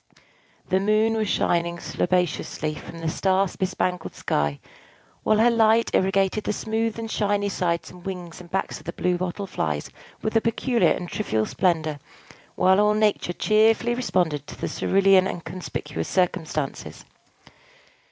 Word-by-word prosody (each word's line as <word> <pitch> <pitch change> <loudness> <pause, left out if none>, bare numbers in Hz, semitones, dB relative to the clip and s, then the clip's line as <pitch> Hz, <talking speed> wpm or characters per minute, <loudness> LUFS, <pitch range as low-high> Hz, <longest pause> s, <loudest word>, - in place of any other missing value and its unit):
The 190 - +3
Moon 215 +3 +2
was 215 -2 0
shining 170 -1 +1
slobaciously 175 -4 -1
from 165 +2 -9
the 165 - -3
star 190 +4 +2
bespangled 180 -2 -2
sky, 75 -1 -1 0.6
while 215 - +3
her 235 +2 +5
light 225 0 +3
irrigated 195 +2 +1
the - - 0
smooth 220 +1 -2
and 225 -1 -5
shiny 205 -1 0
sides 170 -3 -1
and 180 -1 -14
wings 180 -2 -6
and 175 - -14
backs 190 +2 -2
of - - -18
the - - -3
Blue 180 0 0
Bottle 185 +2 -3
Flies 75 - -3 0.3
with 220 - -2
a 225 - +5
peculiar 230 -4 +2
and 180 - -1
trivial 110 - -1
splendor, 160 - 0 0.6
while 190 +1 +4
all 210 0 +4
Nature 210 -4 +1
cheerfully 220 +4 +3
responded 175 - 0
to - - -10
the - - -2
cerulean 195 -1 +3
and 170 - -5
conspicuous 130 - -5
circumstances. 165 -6 -2
190 Hz, 150 wpm, -24 LUFS, 170-215 Hz, 0.6 s, her